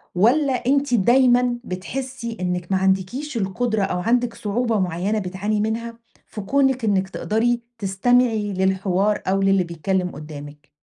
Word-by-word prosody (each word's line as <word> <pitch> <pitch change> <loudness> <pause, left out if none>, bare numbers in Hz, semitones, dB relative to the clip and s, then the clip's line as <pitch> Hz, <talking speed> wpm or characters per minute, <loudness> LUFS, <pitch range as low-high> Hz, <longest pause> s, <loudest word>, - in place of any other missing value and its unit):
والّا 260 +9 +3
أنتِ 275 +2 +1
دايمًا 245 +2 +4
بتحسي 235 +4 -5
إنِك 180 0 -2
ما 190 - +3
عندكيش 190 +9 -1
القدرة 215 +2 -1
أو 180 -2 -1
عندِك 240 +4 +1
صعوبة 225 +1 -1
معينة 185 +4 -1
بتعاني 200 +3 -2
منها 230 +1 -3 0.3
في 210 - -7
كونِك 265 +3 +1
إنِك 195 -2 +1
تقدَري 235 +4 0 0.2
تستمعي 220 +1 +1
للحوار 190 +2 +1
أو 195 +1 +1
للي 195 -1 +3
بيتكلم 180 +2 -2
قدامِك؟ 150 -1 -10
210 Hz, 135 wpm, -22 LUFS, 190-245 Hz, 0.3 s, دايمًا